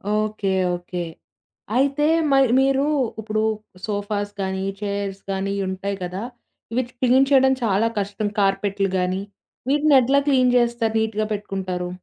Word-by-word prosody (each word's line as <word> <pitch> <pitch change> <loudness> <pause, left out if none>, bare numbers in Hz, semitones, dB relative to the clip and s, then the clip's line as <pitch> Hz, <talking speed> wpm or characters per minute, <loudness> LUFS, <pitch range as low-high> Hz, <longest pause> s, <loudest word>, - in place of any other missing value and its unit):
Okay. 215 -2 -1 0.3
Okay. 175 0 -5 0.7
అయితే 275 +3 +2 0.3
మరి 270 -3 +4
మీరు 270 0 +3 0.4
ఇప్పుడు 215 0 -1 0.4
సోఫాస్ 205 -1 -2
గానీ, 190 0 -2 0.2
చైర్స్ 200 -1 -3
గానీ 195 +1 -2
ఉంటాయి 195 +1 -3
కదా! 180 +2 -4 0.5
ఇవి 255 - +1 0.2
క్లీన్ 260 +2 +4
చేయడం 265 -1 +5
చాలా 220 +1 +2
కష్టం. 205 +1 -2
కార్పెట్లు 195 0 +1
గానీ. 185 +1 -1 0.5
వీటిని 295 +1 +4
ఎట్లా 270 +3 +3
క్లీన్ 255 -3 +4
చేస్తారు? 235 -2 +1
నీట్‌గా 220 -1 -1
పెట్టుకుంటారు? 190 -3 -4
210 Hz, 125 wpm, -22 LUFS, 195-250 Hz, 0.7 s, చేయడం